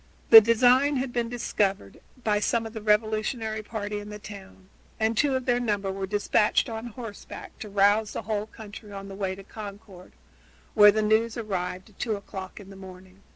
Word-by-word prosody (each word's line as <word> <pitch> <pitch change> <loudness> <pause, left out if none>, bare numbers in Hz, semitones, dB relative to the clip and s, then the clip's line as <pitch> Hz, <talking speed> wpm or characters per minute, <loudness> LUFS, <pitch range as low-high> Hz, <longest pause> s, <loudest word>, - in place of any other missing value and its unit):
The 225 -1 +13
design 250 +6 +4
had 260 -1 -2
been 235 -1 -1
discovered 200 - -2 0.2
by 210 -1 +1
some 230 +2 0
of 225 - -8
the 220 - -6
revolutionary 215 +1 0
party 210 -1 -5
in 205 0 -9
the 210 - -7
town, 195 -2 -12 0.3
and 220 +1 +1
two 275 +3 +2
of 260 -1 -2
their 245 -1 +2
number 205 -5 -1
were 190 0 -4
dispatched 205 +1 +2
on 225 +1 -5
horseback 230 -2 -10
to 215 - -7
rouse 205 +2 +2
the - - -5
whole 210 0 -2
country 210 -1 -11
on 195 0 -8
the 195 - -8
way 190 -1 -3
to 195 - -12
Concord, 200 -3 -11 0.6
where 210 -2 +8
the 215 +1 0
news 220 +2 +1
arrived 190 -2 -4
at 195 - -27
two 225 -3 -1
o'clock 190 -1 -8
in 195 -1 -12
the - - -11
morning. 185 0 -13
210 Hz, 195 wpm, -26 LUFS, 195-225 Hz, 0.6 s, The